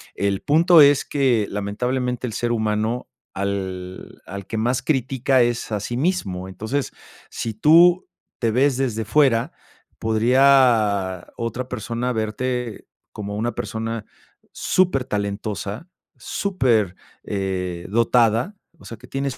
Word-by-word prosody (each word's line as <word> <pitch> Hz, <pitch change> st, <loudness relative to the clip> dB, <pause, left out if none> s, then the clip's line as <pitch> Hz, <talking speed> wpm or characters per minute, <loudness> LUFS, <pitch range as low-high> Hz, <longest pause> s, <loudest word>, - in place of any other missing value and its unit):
el 100 Hz, -1 st, -1 dB
punto 165 Hz, +2 st, +5 dB
es 140 Hz, -1 st, +5 dB
que, 125 Hz, -7 st, +1 dB
lamentablemente 125 Hz, +5 st, -2 dB
el 110 Hz, -, -6 dB
ser 120 Hz, 0 st, -1 dB
humano, 110 Hz, +1 st, -1 dB, 0.3 s
al 95 Hz, -2 st, -5 dB
al 100 Hz, 0 st, -7 dB
que 110 Hz, -, -4 dB
más 125 Hz, +3 st, 0 dB
critica, 130 Hz, -2 st, +1 dB
es 120 Hz, -1 st, 0 dB
a 105 Hz, -, -1 dB
sí 120 Hz, +4 st, -4 dB
mismo, 100 Hz, -, -1 dB
entonces, 110 Hz, +9 st, -3 dB, 0.4 s
si 115 Hz, -, -4 dB
tú 170 Hz, -, +5 dB, 0.3 s
te 115 Hz, -2 st, +1 dB
ves 130 Hz, +2 st, +2 dB
desde 115 Hz, -5 st, -1 dB
fuera, 130 Hz, +3 st, +2 dB, 0.5 s
podría 110 Hz, -5 st, +3 dB
otra 120 Hz, +2 st, -4 dB
persona 120 Hz, +1 st, -3 dB
verte 120 Hz, +1 st, -3 dB, 0.3 s
como 105 Hz, -1 st, -5 dB
una 120 Hz, +2 st, -1 dB
persona 115 Hz, -1 st, -4 dB, 0.5 s
súper 180 Hz, -8 st, +1 dB
talentosa, 105 Hz, -, -4 dB, 0.3 s
súper, 120 Hz, -, 0 dB, 0.3 s
eh, 90 Hz, -3 st, -3 dB
dotada, 115 Hz, -, +2 dB, 0.2 s
o -, -, -19 dB
sea, 115 Hz, -, -8 dB
que 125 Hz, +3 st, -15 dB
tienes 135 Hz, -1 st, -3 dB
115 Hz, 125 wpm, -22 LUFS, 105-130 Hz, 0.5 s, punto